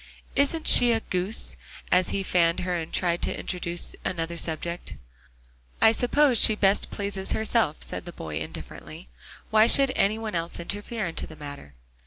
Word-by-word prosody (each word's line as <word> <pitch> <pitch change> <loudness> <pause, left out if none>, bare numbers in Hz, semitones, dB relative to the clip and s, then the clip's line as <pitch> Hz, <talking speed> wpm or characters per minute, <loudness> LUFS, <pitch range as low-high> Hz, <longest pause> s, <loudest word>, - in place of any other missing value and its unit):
"Isn't 295 +3 +1
she 245 -1 +7
a 225 - +1
goose?" 190 +1 -3 0.4
as 180 0 +3
he 195 - -2
fanned 170 -1 +1
her, 180 0 -2
and 165 -2 -5
tried 175 -1 0
to - - 0
introduce 175 -1 -4
another 170 -1 -3
subject. 170 +1 -4 0.8
"I 220 - +6
suppose 250 +2 +3
she 215 - +6
best 200 -1 +2
pleases 200 -1 -2
herself," 220 -7 +1
said - - -5
the 175 - -7
boy 80 - -6
indifferently. 80 -5 -9 0.4
"Why 220 +1 +5
should 275 +1 +6
any 205 +2 +2
one 225 -1 -5
else 170 0 -3
interfere 205 +4 -4
in 165 - -4
the 160 - -4
matter?" 145 - -10
185 Hz, 165 wpm, -25 LUFS, 170-220 Hz, 0.8 s, she